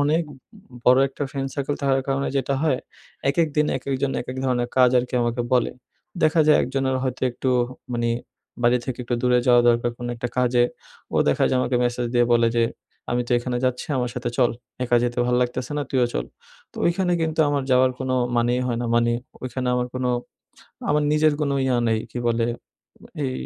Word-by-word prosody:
অনেক 155 +4 +2
ব - - -9 0.5
বড়ো 125 +1 +6
একটা 135 - -7
ফ্রেন্ড 135 -1 -3
সার্কেল 140 0 -2
থাকার 135 -1 +2
কারণে 135 0 0
যেটা 135 +1 0
হয়, 145 -5 +2 0.5
একেক 160 +2 +1
দিন 150 0 +3
একেকজন 135 +1 -2
একেক 125 +1 -6
ধরনের 120 -2 0
কাজ 125 -1 +6
আর 120 - +1
কি - - -7
আমাকে 120 +1 -1
বলে। 125 - +3 0.5
দেখা 155 +1 +4
যায় 150 - +6
একজনের 130 0 -1
হয়তো 130 -1 -3
একটু 130 +2 -2 0.4
মানে 120 0 0 0.5
বাড়ি 120 +1 +4
থেকে 130 -1 -4
একটু 120 - -1
দূরে 125 0 +4
যাওয়া 120 -1 +6
দরকার 120 0 +2
কোন 120 - -6
একটা 120 +1 -3
কাজে 125 -1 +3 0.5
ও - - +2
দেখা 70 - +2
যায় 130 - +1
আমাকে 125 0 0
মেসেজ 120 0 -1
দিয়ে 120 0 +5
বলে 115 0 +4
যে 115 - +4 0.5
''আমি 120 0 +1
তো - - 0
এখানে 125 0 -3
যাচ্ছি 125 -1 -1
আমার 125 -1 -1
সাথে 125 -1 -3
চল। 125 -2 +4 0.3
একা 120 0 +3
যেতে 120 0 -1
ভাল 125 - +1
লাগতেছে 125 +3 -3
না - - 0
তুইও 125 -2 +2
চল।'' - - -3 0.4
তো - - -21
ওইখানে 180 +1 +1
কিন্তু 160 0 0
আমার 145 -1 0
যাওয়ার 130 0 +5
কোনো 130 -1 -1 0.2
মানেই 120 +1 +2
হয় 120 -2 -1
না 120 - -2
মানে 120 0 +3 0.3
ওইখানে 130 0 -3
আমার 125 0 0
কোনো 125 -1 0 0.8
আমার 150 0 +2
নিজের 155 0 +4
কোনো 140 -2 0
ইয়ে 130 -2 +2
নেই 110 -1 +2
কী 125 - -4
বলে 115 0 +1 0.8
এই 130 - -1
125 Hz, 200 wpm, -23 LUFS, 120-135 Hz, 0.8 s, বড়ো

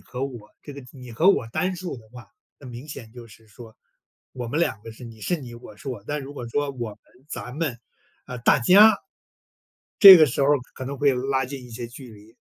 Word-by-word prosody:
和 130 +2 -6
我。 120 -6 -9
这 145 - -9
个 140 0 -11
你 125 -3 -12
和 170 - +4
我 120 - 0
单 185 +10 -2
数 175 -5 -6
的 110 -2 -16
话， 125 -1 -13 0.3
那 140 - -13
明 125 +4 -10
显 115 -6 -10
就 120 -2 -12
是 110 +1 -19
说， 110 +1 -15 0.6
我 125 -2 -6
们 145 +7 -2
两 110 -11 -1
个 115 - -10
是， 110 +3 -12
你 115 -2 -12
是 175 +10 -1
你 120 -3 -10
我 115 -3 -13
是 125 - -10
我， 120 -6 -6
但 150 +4 -4
如 140 +1 -10
果 120 -4 -7
说 145 +4 -2
我 120 -4 -5
们、 - - -15 0.3
咱 125 - -7
们、 145 -5 -3 0.5
啊， 125 - -8
大 115 - +3
家， 200 - +6 1.0
这 195 -3 +12
个 155 -2 +6
时 140 +1 -2
候 135 - +2 0.3
可 130 - -7
能 140 +1 -6
会 140 -1 +3
拉 130 +1 -1
近 130 0 -8
一 125 - -14
些 120 +1 -7
距 125 +1 -12
离。 105 +2 -18
125 Hz, 250 characters per minute, -23 LUFS, 115-145 Hz, 1.0 s, 这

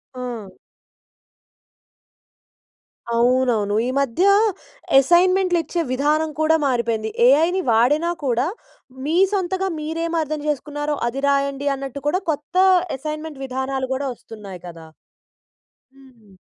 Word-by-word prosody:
ఆ! 235 -6 -7 2.6
అవునవును. 235 -4 +2
ఈ - - -1
మధ్య 275 +5 0 0.8
అసైన్మెంట్‌లు 355 +4 +3
ఇచ్చే 340 +1 -2
విధానం 300 +4 +1
కూడా 315 +1 +4
మారిపోయింది. 230 -4 -1 0.2
ఏఐ‌ని 325 +8 +4
వాడినా 290 +10 +3
కూడా, 250 +2 +1 0.6
మీ 320 +3 0 0.2
సొంతంగా 380 0 -1
మీరేమి 330 +2 -2
అర్థం 305 0 -4
చేసుకున్నారో 295 +1 -2
అది 270 +3 -5
రాయండి 280 0 0
అన్నట్టు 275 0 -7
కూడా, 370 +5 0
కొత్త 295 +3 -7 0.4
అసైన్మెంట్ 305 0 -6
విధానాలు 265 0 -3
కూడా 275 +1 -3
వస్తున్నాయి 200 -6 -11
కదా! 165 -2 -11 1.1
హ్మ్. 245 -7 -20
275 Hz, 100 wpm, -21 LUFS, 245-315 Hz, 2.6 s, కూడా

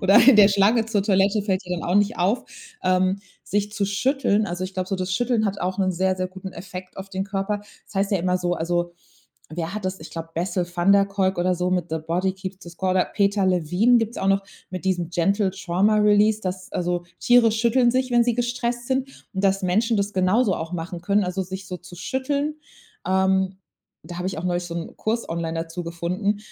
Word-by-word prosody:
Oder 195 0 +5
in 265 -5 +8
der 205 -1 +8
Schlange 205 +3 +3
zur 215 -3 0
Toilette 200 +1 +3
fällt 190 -2 0
ja 180 -1 -3
dann - - -5
auch 180 - +1
nicht 205 +1 +2
auf, 200 +8 +1 0.4
ähm, 185 +1 +2 0.3
sich 205 0 -1
zu 200 -2 -1
schütteln. 220 0 +1
Also, 175 +1 -3
ich 185 - -7
glaube 185 -1 -2
so, 195 - -1
das 185 0 -3
Schütteln 235 -1 +1
hat 200 0 -2
auch 185 +2 -2
'nen 185 -1 +2
sehr, 185 +1 +1
sehr 185 0 -1
guten 190 0 -9
Effekt 185 +1 -9
auf 190 +1 -7
den 190 0 -3
Körper. 200 +1 -2 0.3
Das - - -17
heißt 195 +1 +1
ja 195 - +3
immer 180 +1 +1
so 175 -1 -1
also, 175 +1 -1 0.6
wer 170 +3 -4
hat 210 -3 -5
das 185 0 -3
ich 160 - -9
glaube 165 0 -7
Bessel 180 +1 -1
van 175 +3 +3
der 200 0 +6
Kolk 195 -1 0
oder 180 +1 +2
so 180 +1 -1
mit 180 -2 0
„The 160 - -1
Body 180 +3 0
keeps 190 0 -7
the 170 - -10
score“, 185 +2 -2
oder 185 -1 +3
Peter 200 -1 +1
Levine 185 +7 +3
gibt's 225 +1 -2
auch 195 - -2
noch 195 0 +3 0.3
mit 185 0 -6
diesem 175 -3 0
„Gentle 195 +3 +1
trauma 195 +3 +1
release“, 210 +1 +4
dass 185 -1 -5
also 175 0 -1 0.2
Tiere 240 -3 +5
schütteln 235 +2 +3
sich, 255 0 0
wenn 240 -1 +4
sie 240 -2 +1
gestresst 240 0 -2
sind. 265 0 0 0.3
Und 190 +1 -1
dass 195 0 +2
Menschen 220 +5 +2
das 200 +1 -1
genauso 190 +3 +2
auch 165 +2 -5
machen 170 0 -5
können, 200 +2 +2
also, 180 +1 -2
sich 190 +1 -7
so 180 - -5
zu 175 0 -13
schütteln. 280 - -2 0.5
Ähm, 190 0 +2 0.5
da 175 - -7
habe 180 - -3
ich 190 - -3
auch 165 - -5
neulich 175 0 0
so 170 -1 -6
'n 170 -1 -6
Kurs 230 +2 -2
online 165 -1 -3
dazu 165 +2 -4
gefunden. 180 +5 -2
190 Hz, 225 wpm, -23 LUFS, 180-210 Hz, 0.6 s, in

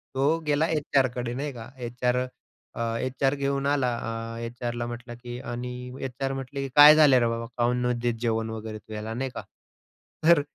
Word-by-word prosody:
तो 145 +5 +3
गेला 150 +2 +3
एचआरकडे, 130 -5 +1
नाही 140 +3 -3
का? 120 -1 -9
एचआर, 125 0 -1 0.6
अ, 115 0 -1
एचआर 135 +2 0
घेऊन 140 0 -1
आला. 135 -4 +2 0.4
अ, - - -6
एचआरला 120 0 -4
म्हटला 120 0 -7
की 120 0 -8
आणि 125 0 -5
एचआर 135 +1 -3
म्हटले 135 +1 -5
की, 135 - -3
"काय 150 +1 +11
झालं 145 -5 +7
रे 120 - +2
बाबा? 115 0 -2
का 120 0 +3
नाही 125 0 +1
देत 120 0 +1
तू - - -9
जेवण 115 -1 0
वगैरे 110 -1 -5
तू 110 +1 -12
याला?" 110 +1 -4
नाही 130 +3 -2
का? - - -4 0.9
तर 170 -3 +7
125 Hz, 190 wpm, -26 LUFS, 120-135 Hz, 0.9 s, काय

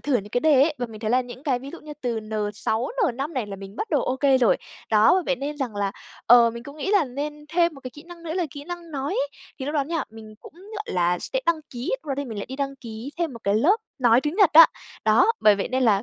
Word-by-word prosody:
thử 290 - -2
những 205 -3 -5
cái 245 - 0
đề 290 -3 +5
ấy, 305 +2 +2
và 245 - -2
mình 220 -2 -11
thấy 220 -1 -2
là 250 +2 +4
những 250 +1 -9
cái 270 -4 0
ví 270 +3 -9
dụ 340 - -10
như 300 - -9
từ 235 -3 -1
N6, 215 +2 -2
N5 280 - -1
này 250 -5 -2
là 200 -1 -7
mình 195 +1 -11
bắt 440 - -4
đầu 290 -5 +2
ô 255 - -1
kê 270 -1 +3
rồi. 240 -4 +4 0.3
Đó, 215 -1 +5
bởi 375 - +2
vậy 275 - +1
nên 285 +3 -4
rằng 255 -7 -4
là, 200 -1 -1 0.3
ờ, 235 0 +7
mình 235 +1 -8
cũng 280 +4 -11
nghĩ 350 +6 -3
là 400 -6 +4
nên 295 +3 -6
thêm 340 0 +2
một 275 - -12
cái 255 - -7
kỹ 295 +4 -13
năng 340 0 -13
nữa 325 -1 -5
là 355 -2 0
kỹ 285 +1 -9
năng 345 0 -8
nói 280 -1 -3
ấy, 280 - 0 0.3
thì 265 - -5
lúc 295 - -3
đó 285 -2 +1
nha, 325 +1 -2
mình 220 -1 -12
cũng, - - -14
gọi 415 +4 -8
là, 175 0 +2
sẽ - - -2
đăng 335 -2 +2
ký, 245 +1 -4
lúc - - -23
đó 275 - 0
thì 285 - -2
mình 225 -5 -6
lại 200 - -5
đi 265 - -7
đăng 275 -1 -3
ký 230 +1 -8
thêm 335 -4 -1
một 230 - -10
cái 200 - +2
lớp 310 - +4 0.2
nói 240 -2 +5
tiếng 295 +3 -2
Nhật 400 -6 +5
á. 325 +1 +10 0.4
Đó, 220 - +5
bởi 210 - +6
vậy 195 - -2
nên 260 +1 0
là 210 -5 +3
265 Hz, 300 wpm, -24 LUFS, 225-305 Hz, 0.4 s, á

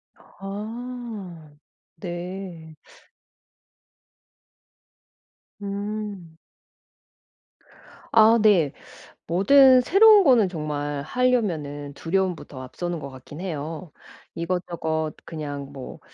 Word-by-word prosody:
아 210 -6 -8 0.4
네. 175 -2 -7 2.8
음. 200 -4 -5 1.8
아 225 +1 +7
네. 185 -10 +4 0.5
뭐든 255 - +6
새로운 410 - +7
거는 240 - +5
정말 145 -3 -3
하려면은 160 - -1
두려움부터 175 -4 -2
앞서는 175 +7 -4
것 140 - -7
같긴 130 +4 -11
해요. 160 -1 -5 0.4
이것저것 165 -3 -2
그냥 145 -3 -6
뭐 135 -2 -9
175 Hz, 140 characters per minute, -24 LUFS, 155-215 Hz, 2.8 s, 아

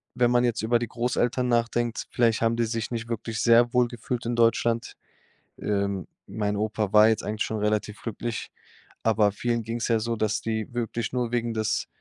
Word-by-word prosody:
wenn 120 0 +3
man 120 0 +4
jetzt 120 -2 0
über 120 +1 +2
die 120 - -3
Großeltern 125 +1 0
nachdenkt, 120 0 0
vielleicht 115 -2 +2
haben 115 0 +2
die 115 - +1
sich 115 0 -3
nicht 115 -1 -3
wirklich 115 -1 -3
sehr 120 0 +5
wohl 125 -1 +4
gefühlt 120 +1 -5
in 120 0 -1
Deutschland. 115 0 +2 0.7
Ähm. 100 -2 -1 0.2
Mein 105 -1 -2
Opa 105 -1 -1
war 105 +1 +8
jetzt 110 - 0
eigentlich 105 0 -2
schon 110 - -3
relativ 105 0 -1
glücklich, 115 0 -4 0.5
aber 110 -2 +3
vielen 115 +3 -1
ging's 115 +1 -3
ja 115 -2 +2
so, 115 +1 -2
dass 110 -1 0
die 110 +1 -3
wirklich 115 -1 -3
nur 120 -2 -1
wegen 120 -1 0
des 110 -1 -1
115 Hz, 190 wpm, -26 LUFS, 110-120 Hz, 0.7 s, war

